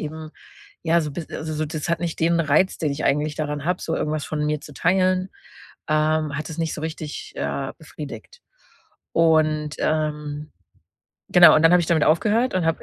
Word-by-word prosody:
eben, 155 0 -6 0.5
ja, 170 +1 +3
so 150 -2 -3
biss 165 0 -7
also, 155 0 -5
so, 155 +1 -1
das 155 +1 -5
hat 170 -1 0
nicht 170 -2 -3
den 170 +1 +3
Reiz, 155 +4 +2
den 150 -3 -1
ich 145 - -4
eigentlich 150 +2 +1
daran 150 -1 -3
habe, 180 +1 -1
so 165 - -2
irgendwas 155 -1 -2
von 150 -1 -2
mir 150 -1 -1
zu 150 - -12
teilen 185 +4 +2 0.6
ähm, 155 -1 +1
hat 150 +3 -4
das 160 - -8
nicht 165 -2 -1
so - - -6
richtig, 155 -1 -6
äh, 135 -1 -3
befriedigt. 160 - -10 0.7
Und, 155 -2 +2
ähm 150 -1 -2 0.8
genau, 175 -3 +8
und 155 - +3
dann 165 - +6
habe 180 - +6
ich 170 - -2
damit 160 -3 +2
aufgehört 215 +10 +2
und 185 - +1
habe 165 - 0
155 Hz, 190 wpm, -23 LUFS, 150-170 Hz, 0.8 s, genau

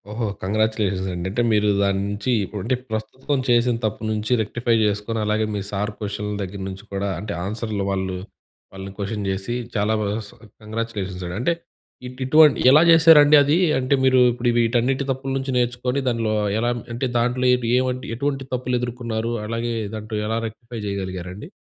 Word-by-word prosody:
ఓహో! 110 +1 -2 0.2
కంగ్రాచులేషన్సండి. 95 -3 -1
అంటే 110 +5 -1
మీరు 105 0 +3
దాని 100 -1 +1
నుంచీ 105 +4 -2 0.3
ఉంటే, 115 +7 0 0.2
ప్రస్తుతం 120 +6 -2
చేసిన 120 0 +3
తప్పు 110 0 -2
నుంచి 110 +2 -2
రెక్టిఫై 115 +2 0
జేసుకొని, 105 +2 -1
అలాగే 105 +1 +1
మీ - - -1
సారు 105 +1 -2
కొషన్‌ల 105 0 -4
దగ్గర 95 +1 -5
నుంచి 95 +1 -8
కూడా, 100 +1 -1
అంటే, 105 +2 -5
ఆన్సర్లు 105 0 -3
వాళ్ళు 95 -1 -2 0.6
వాళ్ళని 95 0 -7
కొషన్ 100 0 -3
జేసి 95 +4 -3 0.2
చాలా 105 +1 +1
బా - - -1 0.2
స్ - - -14 0.3
కంగ్రాచులేషన్సండి. 100 -5 -4
అంటే, 150 +8 +1 0.5
ఇటు 125 +1 -11
ఇటువంటి 150 +2 +6
ఎలా 150 +3 +7
జేశారండీ 155 -2 +8
అదీ? 145 +4 +2 0.2
అంటే, 130 +2 0
మీరు 130 -1 +5
ఇప్పుడు 120 0 0
వీటన్నిటి 120 +4 +1
తప్పులు 135 +1 -3
నుంచి 135 0 -3
నేర్చుకొని 125 +2 0
దానిలో 115 -3 0 0.3
ఎలా 120 +1 +1 0.2
అంటే, 120 +3 -1
దాంట్లో 125 +2 0
ఏబ్ 125 -2 -3
ఏవంటి 130 0 -1
ఎటువంటి 135 +1 -2
తప్పులెదురుకున్నారు? 120 -2 -2
అలాగే, 115 +2 -2 0.2
దాంట్లో 110 0 -5
ఎలా 110 +1 -1
రెక్టిఫై 115 +1 -9
జెయగలిగారండి? 95 - -5
115 Hz, 155 wpm, -22 LUFS, 105-125 Hz, 0.6 s, జేశారండీ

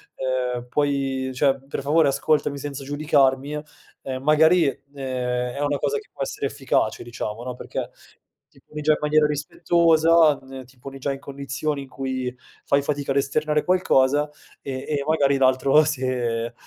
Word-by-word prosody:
ehm, 125 -2 -2
puoi 135 -1 -1
cioè 135 0 +1
per 140 - -5
favore 150 +1 +3
ascoltami 140 +1 +1
senza 140 0 -6
giudicarmi", 145 -1 +1 0.5
ehm, 130 -1 -5
magari, 160 +3 +5
ehm, 125 -3 -3
è - - -5
una 145 -1 0
cosa 445 - -1
che 425 - -10
può - - -4
essere - - -3
efficace, - - -1
diciamo, 115 -1 -5
no, 125 -1 -4
perché - - -5 0.6
ti - - -23
poni 150 - -8
già 155 +1 +3
in - - -1
maniera 150 0 +3
rispettosa, 160 +1 +3
ehm, 130 0 -9
ti 130 +1 -22
poni 135 +1 -9
già 140 +1 -1
in 135 - -8
condizioni 140 +1 -4
in 135 - -14
cui 130 -2 -3 0.3
fai 140 0 +3
fatica 140 -1 -2
ad 140 - +1
esternare 150 +2 +1
qualcosa 150 -5 +2 0.3
e 130 -2 -5
e 145 -2 -1
magari 140 -3 +2
l'altro, 135 +3 +4
se, 125 -5 -2
140 Hz, 160 wpm, -23 LUFS, 130-150 Hz, 0.6 s, magari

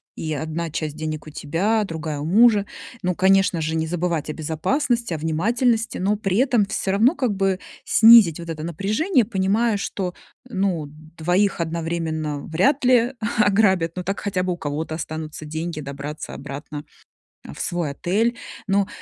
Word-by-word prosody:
И 155 -1 -3
одна 160 +2 -3
часть 155 -1 -3
денег 155 -1 -5
у - - -7
тебя, 185 +9 0
другая 160 -5 -4
у 145 - -4
мужа. 210 +3 +5 0.4
Ну, 180 - +1
конечно 190 -2 +3
же, 160 +1 -1
не 160 0 0
забывать 165 -2 -2
о - - -5
безопасности, 230 - -1
о 160 - -2
внимательности, 225 - 0
но 200 +3 +1
при 195 -2 -1
этом 245 -5 +3
всё 195 0 -2
равно 225 +9 +4
как 245 -9 0
бы 195 -1 +1 0.3
снизить 220 -8 +7
вот 170 -1 -8
это 155 -1 -5
напряжение, 215 - +1
понимая, 205 +2 +1
что, 190 -2 -4 0.3
ну, 190 -8 -1 0.3
2 180 +3 +1
одновременно 160 -2 -2
вряд 190 - +1
ли 245 0 +4 0.2
ограбят, 195 -5 +3
ну, 180 - -4
так 195 +2 -3
хотя 190 -3 -1
бы 180 -1 -1
у - - -7
кого-то 155 +1 -4
останутся 155 -1 -6
деньги 160 +1 -4
добраться 140 +2 -7
обратно, 145 +1 -7 0.6
э, - - -8
в - - -12
свой 175 -3 -2
отель. 220 - 0 0.3
Но 195 0 +1
180 Hz, 165 wpm, -22 LUFS, 160-210 Hz, 0.6 s, снизить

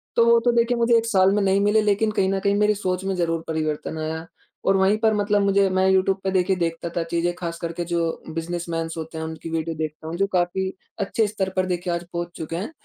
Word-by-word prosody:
तो 235 - +5
वो 235 0 +6
तो 240 - +5
देखिए 235 +1 +2
मुझे 235 0 +3
1 225 - 0
साल 195 -4 +4
में 210 - +2
नहीं 195 0 +3
मिले 210 +1 +3
लेकिन 210 +1 +2
कहीं 190 -2 +1
न 195 - 0
कहीं 200 +1 +1
मेरी 210 0 +3
सोच 185 -2 -2
में 195 -1 -1
ज़रूर 165 -2 -1
परिवर्तन 155 0 -2
आया। 160 +1 -4 0.4
और 195 0 +4
वहीं 195 +3 +3
पर 220 0 +2
मतलब 205 0 +2
मुझे 200 0 +3
मैं 185 0 +2
यूट्यूब 190 0 +2
पे 190 - 0
देखिए, 190 0 +2
देखता 170 -1 -2
था 170 - +1
चीज़ें 170 +1 -1
खास 170 -2 -5
करके 170 +1 -3
जो 170 -1 -1
बिजनेसमैन्स 165 0 -3
होते 160 0 -6
हैं, 160 - -3
उनकी 160 +1 -7
वीडियो 165 0 -2
देखता 155 0 -5
हूँ 165 - -4
जो 195 +1 +2
काफ़ी 185 +1 0 0.3
अच्छे 210 +2 +1
स्तर 200 -2 -2
पर 185 0 +2
देखिए 175 -1 -2
आज 170 - -2
पहुँच 170 0 -3
चुके 165 0 -5
हैं। 195 - -4
185 Hz, 245 wpm, -23 LUFS, 165-200 Hz, 0.4 s, वो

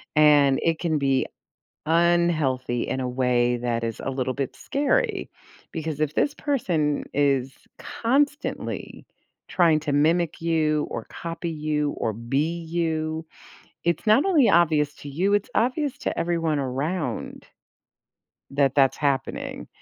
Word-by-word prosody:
and 145 -3 +5
it 165 -1 +1
can 160 -3 0
be 135 -2 +1 0.6
unhealthy 160 -8 +2
in 130 - -2
a 125 -1 -2
way 125 -1 +1
that 120 -1 -2
is 115 -1 -3
a 135 - -3
little 130 -1 -2
bit 135 -2 -3
scary, 295 - 0 0.4
because 160 -2 -4
if 155 -1 0
this 285 - +1
person 175 - 0
is 135 -2 +1 0.2
constantly 285 +5 -2 0.4
trying 165 -4 +3
to 150 -1 -3
mimic 160 +3 +2
you 155 -2 +1
or - - -4
copy 170 0 -5
you 150 -2 -1
or 110 - -1
be 135 +10 -1
you, 160 -1 -2 0.6
it's 170 +5 -1
not 215 +7 +6
only 320 -11 +4
obvious 150 -4 +3
to 145 - -9
you, 185 +8 0
it's 205 0 +1
obvious 275 +3 0
to - - -3
everyone 165 -3 0
around 145 +6 -3 1.1
that 135 -1 +2
that's 135 -2 +4
happening, 140 -2 -2
155 Hz, 135 wpm, -24 LUFS, 135-170 Hz, 1.1 s, not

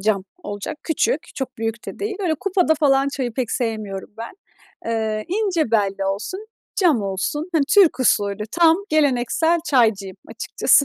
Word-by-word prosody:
Cam 195 -2 +1 0.2
olacak, 205 +10 -5
küçük, 320 0 0
çok 260 -3 -5
büyük 225 0 -3
de - - -7
değil, 410 0 -3
böyle, 335 -4 +1
kupada 360 -1 +1
falan 275 -2 +3
çayı 260 -4 -3
pek 245 -2 -2
sevmiyorum 215 -5 -3
ben. 230 - -6 0.5
Eee, 220 -2 -1
ince 360 - 0
belli 200 -3 +1
olsun, 210 - -3 0.3
cam 320 - +3
olsun, 200 - -2
hani, 315 -4 +3
Türk 380 -9 +5
usulü. 205 -4 +2
Tam 335 -1 +5
geleneksel 310 +3 +2
çaycıyım 220 - +2
açıkçası. 280 - +2
260 Hz, 150 wpm, -21 LUFS, 215-320 Hz, 0.5 s, Türk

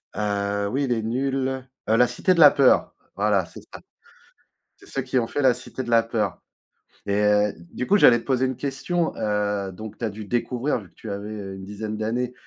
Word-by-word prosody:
heu, 100 0 -1
oui, 135 +5 -1
Les 115 -3 0
Nuls, 130 +2 -1 0.2
heu, 110 - +4
la 125 0 +5
Cité 125 +9 +1
de 170 - -1
la 145 -2 +10
peur, 135 -2 +3 0.2
voilà, 100 -2 +2
c'est 80 - -12
ça. - - -9 1.0
C'est - - -18
ceux 135 - -3
qui 130 0 0
ont 115 - -1
fait 145 - -2
la 130 -3 +5
Cité 130 - -6
de 120 - -7
la 115 0 +6
peur. 105 -6 -2 0.7
Et 100 - 0
heu, 105 0 +3 0.2
du 125 - -3
coup, 205 +1 +4
j'allais 120 -8 +7
te - - -16
poser 130 -1 +1
une 130 -1 -3
question, 160 +5 -2
heu, 105 -2 -1
donc 110 +3 -9
tu - - -4
as - - -2
dû 105 +2 -8
découvrir 120 +4 -1
vu 100 - -14
que - - -34
tu 110 - -9
avais, 100 +1 -5
heu, 100 -3 -6
une 95 - -9
dizaine 105 +2 -5
d'années, 120 +3 -2
115 Hz, 220 wpm, -24 LUFS, 105-130 Hz, 1.0 s, la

